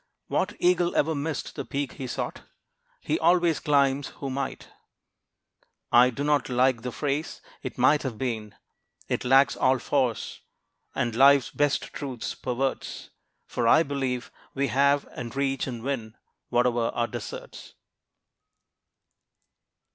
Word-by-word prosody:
What - - -1
eagle 175 -1 +2
ever 160 +2 +2
missed 145 0 -4
the - - -4
peak 140 -1 -3
he 135 -3 -6
sought? 120 - -4 0.6
He 325 - -1
always 175 -2 +3
climbs 140 -1 +2
who 135 -2 -4
might. 135 0 -4 1.2
I 125 +1 +7
do 135 +3 -4
not 145 -2 +1
like 125 -1 +2
the 125 +1 -4
phrase, 145 +4 -2 0.2
"It 130 - -6
might 135 +4 +4
have 125 -5 -4
been!" 110 -4 -3 0.5
It - - -1
lacks 135 +2 +5
all 130 0 +3
force, 130 -3 -1 0.5
and 120 -1 0
life's 135 +2 +5
best 145 -1 0
truths 130 -5 -5
perverts: 130 +1 -3 0.3
For 120 - -1
I 160 +7 +6
believe 135 -4 -3 0.2
we 140 0 0
have, 140 +1 +3
and 120 -1 -6
reach, 135 -1 0
and 120 -3 -6
win, 120 -5 -4 0.3
Whatever 120 -1 +2
our 120 - +1
deserts. 120 -2 -8
135 Hz, 130 wpm, -26 LUFS, 125-140 Hz, 1.2 s, I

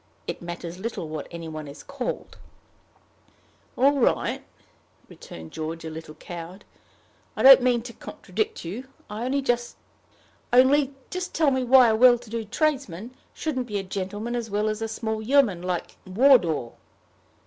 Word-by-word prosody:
It - - -5
matters 175 0 -7
little 215 -5 -4
what 155 -1 -6
any 170 -1 -7
one 155 -1 -7
is 140 - -11
called." - - -5 1.4
"All 280 +2 +4
right," 240 - +1 0.6
returned 80 -1 -11
George, 160 +1 -5
a 160 - -5
little 155 -1 -9
cowed; 175 +3 -9 0.7
"I - - -2
don't 265 0 +10
mean 245 -2 +2
to 240 -1 -9
contradict 435 - -4
you. 225 +10 -6 0.2
Only 255 +6 -1
just 240 -2 -1 1.6
tell 310 -4 +3
me 260 -1 0
why 250 -1 +7
a 220 - +3
well 245 +1 +7
to 240 -1 -15
do 230 -1 -2
tradesman 255 - -2 0.2
shouldn't 260 -6 -3
be 210 -3 -3
a 195 - -2
gentleman 205 +5 -4
as 235 -2 -3
well 210 +1 0
as 215 +1 -3
a 225 - -1
small 220 0 -3
yeoman 225 -7 +3
like 180 -1 -4
Wardour." 185 - +4
220 Hz, 150 wpm, -25 LUFS, 175-255 Hz, 1.6 s, don't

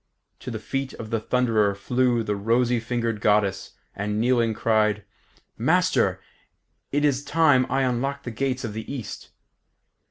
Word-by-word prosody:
To - - -7
the 115 - -4
feet 135 +5 -4
of 110 -1 -8
the 115 - +1
Thunderer 110 -4 +1
flew 120 +3 +1
the 105 -1 -1
rosy 120 +4 +1
fingered 115 -2 -2
Goddess, 100 -2 +1 0.2
and 105 +1 -2
kneeling, 115 -1 +2
cried, 105 -2 +1 0.6
"Master, - - +2 0.7
it 145 +1 +1
is 140 -1 +1
time 145 -5 +3
I 135 +1 +1
unlocked 135 +3 -1
the 120 - -5
gates 130 +3 -2
of 110 -3 -4
the 110 +3 -6
East." 130 -6 -7
120 Hz, 150 wpm, -24 LUFS, 110-130 Hz, 0.7 s, time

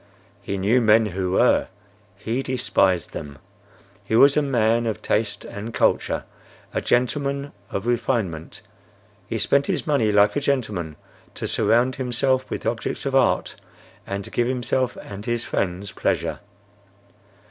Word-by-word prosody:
He 100 - -3
knew 105 +7 +3
men 110 0 +5
who 95 -2 -2
were. - - +3 0.5
He 115 +5 -2
despised 100 - +1
them. 70 -1 -7 0.7
He 110 - -1
was 140 +4 +7
a 150 - +4
man 115 -4 +2
of 110 - -3
taste 110 -1 -1
and 110 +3 -7
culture, - - +1 0.5
a - - -1
gentleman 140 +3 0 0.2
of 100 - -4
refinement. 110 -9 -2 0.6
He 115 - -2
spent 140 +6 +2
his - - -1
money 140 -9 +2
like 105 0 +4
a 145 - 0
gentleman, 105 - -1 0.4
to - - -3
surround 115 +4 +2
himself 130 +1 0
with - - -5
objects 115 +3 -2
of 135 - -1
art 135 -2 +2 0.5
and 100 0 -3
to - - -9
give 120 -1 +1
himself 125 0 -1
and 100 0 -8
his 120 0 0
friends 95 -2 -2
pleasure. - - -1
115 Hz, 145 wpm, -23 LUFS, 100-130 Hz, 0.7 s, was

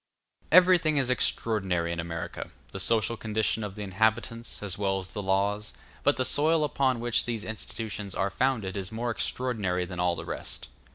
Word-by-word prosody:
Everything 175 -3 +6
is 130 -2 +2
extraordinary 95 -9 0
in 85 - -3
America, 85 0 -5 0.2
the 95 - -6
social 115 +3 +3
condition 110 0 -1
of 100 -2 -5
the 105 - -5
inhabitants, 110 +4 -1
as 95 -3 -1
well 95 -1 0
as 95 -1 -6
the 105 - -3
laws; 100 +2 0 0.3
but 145 - +3
the 130 - +1
soil 155 +3 +4
upon 130 -3 +1
which 120 0 +1
these 115 -3 -3
institutions 110 -2 -5
are 95 +2 0
founded 115 -6 0
is 95 -1 -4
more 120 +2 -2
extraordinary 105 -8 -1
than 90 0 -7
all 90 -1 +2
the - - -7
rest. - - -6
110 Hz, 175 wpm, -28 LUFS, 95-120 Hz, 0.3 s, Everything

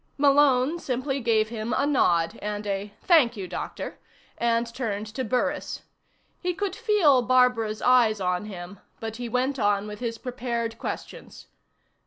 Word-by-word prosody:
_ - - -45
Malone 285 +1 +4
simply 270 0 -2
gave 220 -3 +2
him 230 0 -3
a 280 - +2
nod, 210 - +2
and 210 0 -4
a 200 0 -3
"Thank 280 - +4
you, 190 -2 -5
Doctor," 180 - -6 0.4
and 235 0 +1
turned 220 -5 -3
to 260 - -2
Burris. 265 +5 -2 0.6
He 360 -1 -2
could 400 0 -2
feel 410 - +4
Barbara's 245 -4 +2
eyes 240 -4 +4
on 180 +1 -1
him, 185 -1 -8 0.2
but 225 0 -5
he 240 -1 -5
went 255 +3 0
on 205 -1 +2
with 210 0 -7
his 230 -2 -3
prepared 235 -2 -4
questions. - - -7
235 Hz, 155 wpm, -26 LUFS, 210-265 Hz, 0.6 s, Malone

